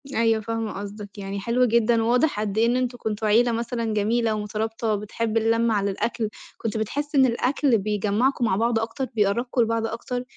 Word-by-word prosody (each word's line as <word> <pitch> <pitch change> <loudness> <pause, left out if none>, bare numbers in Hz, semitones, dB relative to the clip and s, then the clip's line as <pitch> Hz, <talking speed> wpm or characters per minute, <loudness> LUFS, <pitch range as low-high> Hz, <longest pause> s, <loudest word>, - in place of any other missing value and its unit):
أيوه، 225 -1 +2
فاهمة 225 0 -3
قصدك. 205 0 -8
يعني 200 0 -5
حلو 235 +5 +2
جدًا 230 0 +3
وواضح 245 +2 +2
قد 210 -1 -2
إيه 225 - +4
إن 240 +1 +2
أنتم 250 -1 -2
كنتم 215 -1 -2
عيلة 235 +3 +4
مثلًا 230 -1 -2
جميلة 220 +2 +1
ومُترابطة 220 +1 -2
وبتحِب 215 +2 -2
اللمة 230 +1 +2
على 200 -1 +1
الأكل. 220 +2 -2 0.3
كنت 225 0 -3
بتحِس 290 +8 -3
إن 265 -1 +6
الأكل 255 +1 +2
بيجمّعكم 210 +5 0
مع 190 - +2
بعض 230 +2 +1
أكتر، 230 +4 -3
بيقربّكم 235 +4 +1
لبعض 230 0 +1
أكتر؟ 245 +2 -4
225 Hz, 180 wpm, -24 LUFS, 210-235 Hz, 0.3 s, إن